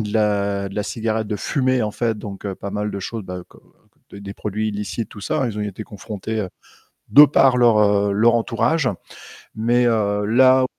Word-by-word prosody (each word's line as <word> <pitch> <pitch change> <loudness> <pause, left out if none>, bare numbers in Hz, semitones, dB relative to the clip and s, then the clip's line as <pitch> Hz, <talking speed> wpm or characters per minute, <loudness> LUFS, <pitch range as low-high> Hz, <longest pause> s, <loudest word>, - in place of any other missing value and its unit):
de 105 -1 -4
la 100 -2 0
de 95 - -11
la 105 - -1
cigarette, 110 0 -2
de 105 0 -3
fumer, 130 +3 0
en 105 - -1
fait, 115 +1 -1
donc 100 -1 -8
heu, 95 - -3
pas 100 - -7
mal 105 +1 -3
de 100 - -5
choses, 110 +3 -5
bah 90 -1 -7 0.7
des 100 0 -9
produits 110 +1 -3
illicites, 105 +1 -4
tout 105 - -12
ça, 125 +6 -1
ils 105 -2 -5
ont - - -1
été 105 0 -5
confrontés, 110 +1 -5
heu, 95 - -3 0.6
de 145 +2 +9
par 135 -2 +3
leur, 120 -3 +5
heu, 100 -1 +3
leur 115 +3 +4
entourage. 120 +5 0 0.7
Mais 120 +3 +2
heu 105 -3 0
là 130 +4 +5
110 Hz, 195 wpm, -21 LUFS, 100-115 Hz, 0.7 s, de